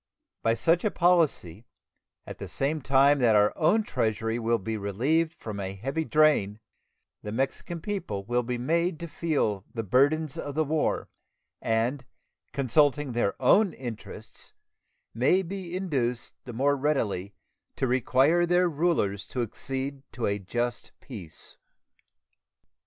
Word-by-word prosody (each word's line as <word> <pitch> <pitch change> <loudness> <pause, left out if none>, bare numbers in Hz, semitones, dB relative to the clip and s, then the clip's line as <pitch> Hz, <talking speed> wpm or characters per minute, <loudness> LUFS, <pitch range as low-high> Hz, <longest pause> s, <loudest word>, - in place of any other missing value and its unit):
By 115 0 +2
such 165 +7 +2
a 215 - +2
policy, 160 - +1 0.6
at - - -9
the - - -6
same 145 +3 -1
time 140 +2 +4
that 115 -4 +4
our 105 0 +4
own 215 +7 +3
Treasury 115 - -1
will 115 0 +1
be 110 +2 -4
relieved 135 - 0
from 105 -2 -7
a 95 0 -4
heavy 135 +10 -3
drain, 150 -11 +3 0.6
the 105 - -6
Mexican 135 +8 -2
people 170 - -4
will 120 +2 +1
be 125 +1 -3
made 165 +6 0
to 170 - -4
feel 145 - -1
the 115 - -2
burdens 140 - +2
of 145 -1 -5
the 155 - +2
war, 155 +1 0 0.5
and, 115 +4 0 0.5
consulting 140 +1 +2
their 120 -4 -1
own 190 +9 +4
interests, 120 -4 -9 0.6
may 140 +11 +3
be 180 -1 -6
induced 130 -10 -2
the 125 - -7
more 140 +5 +2
readily 110 -9 -1 0.4
to - - 0
require 130 +7 +3
their 180 +1 +3
rulers 150 - 0
to 125 - -2
accede 135 +4 -4
to 120 - -2
a 100 0 0
just 120 +5 -3
peace. 100 - -10
135 Hz, 140 wpm, -27 LUFS, 115-155 Hz, 0.6 s, time